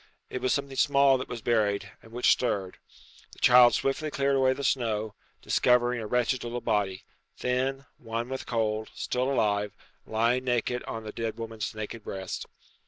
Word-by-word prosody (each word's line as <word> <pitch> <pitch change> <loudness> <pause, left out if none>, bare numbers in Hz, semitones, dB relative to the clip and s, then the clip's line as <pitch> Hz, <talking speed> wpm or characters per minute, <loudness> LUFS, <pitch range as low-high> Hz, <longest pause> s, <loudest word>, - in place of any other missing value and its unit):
It 130 - -4
was 130 - +1
something 140 -1 -1
small 140 -2 +4
that 130 - -5
was 115 -3 -6
buried, 105 -4 +1
and 115 - -17
which 120 +1 +3
stirred. 100 -7 0 0.5
The - - -14
child 125 -1 +7
swiftly 145 +3 -1
cleared 140 -1 +1
away 130 -1 +3
the 140 - -6
snow, 110 -5 0 0.3
discovering 125 -1 +3
a 110 - -5
wretched 125 +2 +1
little 120 +1 -3
body 105 -5 -1 0.3
thin, 130 +2 -1
wan 115 0 -4
with 130 0 -5
cold, 110 -2 -1
still 125 +2 -1
alive, 105 -5 +1 0.3
lying 120 +3 +1
naked 125 0 0
on 110 0 -5
the 105 - -6
dead 115 0 -4
woman's 110 -2 -5
naked 110 +1 -6
breast. 95 -2 -5
120 Hz, 170 wpm, -28 LUFS, 110-130 Hz, 0.5 s, child